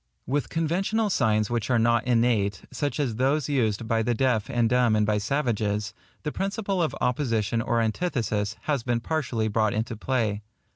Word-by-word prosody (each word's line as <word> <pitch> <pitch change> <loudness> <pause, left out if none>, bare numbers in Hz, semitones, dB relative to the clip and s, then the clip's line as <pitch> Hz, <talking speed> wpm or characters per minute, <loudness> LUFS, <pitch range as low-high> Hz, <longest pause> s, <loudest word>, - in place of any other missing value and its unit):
With 140 +1 -1
conventional 195 +7 0
signs 110 - +1
which 120 -1 -1
are 125 - +3
not 115 +1 +2
innate, 115 -5 +2
such 145 +3 -2
as 125 -7 -1
those 135 +3 +1
used 115 -6 0
by 115 -1 +1
the 120 +2 0
deaf 120 -3 +1
and 120 -3 +2
dumb 120 -2 +3
and 105 0 +3
by 105 0 +1
savages, 105 -4 -1 0.3
the 150 - -2
principle 195 0 -2
of 160 - 0
opposition 115 -4 0
or 115 0 0
antithesis 110 - -1
has 145 -4 -1
been 120 0 0
partially 125 -6 -1
brought 110 0 +1
into 115 +1 -2
play. 110 -3 -1
120 Hz, 175 wpm, -26 LUFS, 110-140 Hz, 0.3 s, are